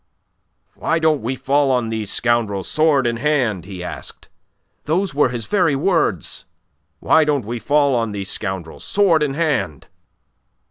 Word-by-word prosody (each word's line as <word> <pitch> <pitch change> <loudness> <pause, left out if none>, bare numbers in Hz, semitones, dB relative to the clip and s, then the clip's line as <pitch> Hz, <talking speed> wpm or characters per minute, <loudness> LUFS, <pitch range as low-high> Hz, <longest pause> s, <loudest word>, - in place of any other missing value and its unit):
'Why 165 - -1
don't 160 -3 +2
we 125 +4 -2
fall 140 +2 +1
on 125 -3 +1
these 110 -2 -3
scoundrels, 115 -5 0
sword 155 -4 +2
in 120 -1 0
hand?' 120 - 0
he 95 -2 -7
asked. 80 -7 -8 0.6
Those 180 +3 0
were 145 -2 +3
his 120 -3 -4
very 175 - +2
words: 155 - 0 0.6
'Why 160 - +4
don't 145 -6 0
we 120 +2 -4
fall 140 +4 +2
on 115 -3 0
these 100 -1 -4
scoundrels, 95 -5 -5
sword 190 -6 +3
in 140 -2 0
hand. 145 - -1
130 Hz, 150 wpm, -20 LUFS, 105-150 Hz, 0.6 s, Why